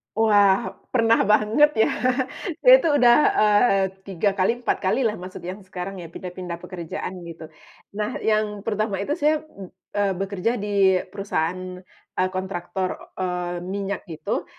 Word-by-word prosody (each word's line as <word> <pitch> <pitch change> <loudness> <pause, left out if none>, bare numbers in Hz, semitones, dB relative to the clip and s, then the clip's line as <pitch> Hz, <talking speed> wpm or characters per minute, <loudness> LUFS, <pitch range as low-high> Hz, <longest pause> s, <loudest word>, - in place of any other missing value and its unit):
Oh, 220 0 +2
wah, 205 +1 +4 0.2
pernah 230 -2 +4
banget 215 +8 +4
ya. - - +4 0.7
Saya - - +9
tuh 325 - +3
udah, 240 -1 +7 0.3
eee, 210 -1 +4 0.2
3 195 +1 0
kali 230 +6 +1
4 240 - 0
kali 195 +8 +2
lah 220 -3 0
masuk 185 +1 -9
yang 185 +3 -6
sekarang, 185 +1 -6
ya 175 - -8
pindah-pindah 180 -2 -7
pekerjaan 180 0 -6
gitu. 160 -1 -9 0.5
Nah, 210 0 -3
yang 215 -2 0
pertama 210 -2 -2
itu 295 - -2
saya 300 0 +2
b 195 - -13 0.2
eee, 200 -1 +2
bekerja 195 +3 -2
di 195 -3 +3
perusahaan, 185 -1 -3 0.3
eee, 185 0 0
kontraktor, 185 0 -3 0.3
eee, 180 -1 -2
minyak 200 +1 -4
gitu, 165 -4 -4
195 Hz, 150 wpm, -23 LUFS, 185-215 Hz, 0.7 s, Saya